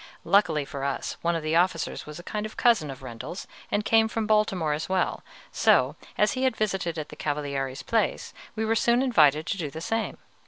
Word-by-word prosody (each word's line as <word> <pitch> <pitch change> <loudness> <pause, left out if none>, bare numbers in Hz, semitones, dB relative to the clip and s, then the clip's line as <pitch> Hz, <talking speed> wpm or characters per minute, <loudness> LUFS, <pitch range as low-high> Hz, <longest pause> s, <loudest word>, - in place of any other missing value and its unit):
Luckily 170 -5 +3
for 135 0 -6
us, 140 -1 -3
one 170 0 +1
of 165 - -3
the 155 +1 0
officers 170 -3 0
was 150 0 -8
a 175 - -9
kind 210 +2 -4
of 215 - -15
cousin 230 -11 +3
of 135 -1 -8
Rendel's, 125 - -7 0.2
and 210 +1 0
came 225 0 +4
from 220 0 -2
Baltimore 205 -7 +2
as 155 +4 -4
well, 185 -1 0 0.3
so, - - +3 0.2
as 210 - +3
he 255 - -3
had 260 -3 +1
visited 190 -6 -1
at 155 - -5
the - - -10
Cavaliere's 140 -3 -3
place, 220 - -1 0.2
we 220 0 -1
were 220 - +2
soon 235 +3 +3
invited 155 - +4
to 195 - -3
do 155 -4 -2
the 160 - -7
same. 225 +7 -2
175 Hz, 210 wpm, -26 LUFS, 150-215 Hz, 0.3 s, came